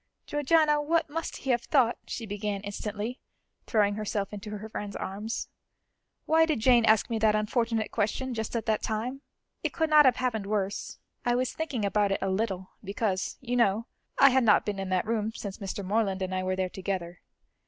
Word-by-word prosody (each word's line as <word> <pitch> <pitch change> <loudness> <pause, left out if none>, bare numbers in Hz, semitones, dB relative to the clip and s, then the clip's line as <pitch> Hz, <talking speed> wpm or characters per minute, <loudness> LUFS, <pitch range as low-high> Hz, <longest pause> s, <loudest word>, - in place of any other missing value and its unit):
"Georgiana, 295 +1 +3
what 320 0 +1
must 330 +1 -4
he 270 - -1
have 240 -1 +2
thought?" 245 -3 +3
she 230 - -4
began 205 -1 -3
instantly, 210 +3 -4 0.5
throwing 205 -3 +3
herself 205 -1 -3
into 210 +1 -7
her 215 +2 -7
friend's 205 -2 -6
arms. 205 +4 -4 0.8
"Why 320 +1 +4
did 310 -7 0
Jane 240 0 +5
ask 220 +2 +4
me 225 - 0
that 215 -1 +4
unfortunate 225 +1 0
question, 240 +4 -1
just 220 0 -4
at 230 - -1
that 215 -1 +1
time? 240 +5 -3 0.4
It - - -2
could 320 -1 0
not 300 -1 +8
have 255 -2 +5
happened 225 -6 -1
worse. 200 -1 -2 0.3
I 240 -1 +2
was 255 +1 0
thinking 285 -10 -2
about 200 0 +2
it 195 - +2
a 195 - -1
little, 190 -2 -2
because, 200 -1 -2
you 245 -1 -2
know, 225 -2 +2 0.3
I 275 - +7
had 260 0 +4
not 210 -3 +5
been 205 -2 -2
in 195 -1 -3
that 185 -1 +1
room 220 0 -1
since 200 -2 -6
Mr. 195 -1 -4
Morland 195 -1 0
and 185 0 -3
I 185 - 0
were 185 0 -1
there 185 0 0
together. 180 -2 -4
215 Hz, 195 wpm, -28 LUFS, 200-245 Hz, 0.8 s, not